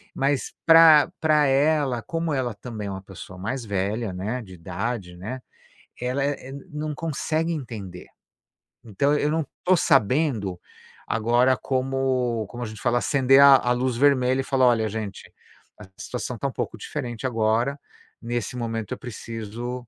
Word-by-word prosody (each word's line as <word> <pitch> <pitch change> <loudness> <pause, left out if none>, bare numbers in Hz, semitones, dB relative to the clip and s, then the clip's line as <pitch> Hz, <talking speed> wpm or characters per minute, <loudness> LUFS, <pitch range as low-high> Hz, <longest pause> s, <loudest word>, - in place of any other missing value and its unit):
mas 135 0 0
pra 165 -1 +7
pra 155 -2 +3
ela, 140 -2 +2
como 165 -1 -2
ela 130 -4 -1
também 105 -1 -7
é - - -4
uma 95 0 -7
pessoa 95 -1 -11
mais 120 +7 -4
velha, 100 +1 -2
né, 105 +8 -3
de 95 -5 -12
idade, 90 +2 -5
né, 115 +8 -6 0.6
ela 125 +3 -1
é 140 -2 -3
é, - - -8 0.2
não 150 -1 -4
consegue 160 +1 -2
entender. 105 - -7 0.8
Então 130 +7 +1
eu 150 +1 0
não 160 -1 0 0.2
tô 185 0 +4
sabendo 130 - +2 0.5
agora 120 +3 +3
como 130 -3 -1
como 120 +3 -7
a - - -2
gente 110 -2 -9
fala, 120 0 +2
acender 135 0 +4
a 140 -1 +9
a 125 - -1
luz 125 0 0
vermelha 130 -1 +3
e - - -5
falar: 130 -2 +2
"Olha, 110 -3 +2
gente, 105 -2 -6 0.5
a 105 - -10
situação - - -5
tá - - -2
um - - -7
pouco - - -4
diferente 120 -1 -5
agora, 115 +3 +1 0.4
nesse 120 0 -3
momento 115 -2 -3
eu - - -5
preciso 120 +1 -6
125 Hz, 160 wpm, -24 LUFS, 110-140 Hz, 0.8 s, a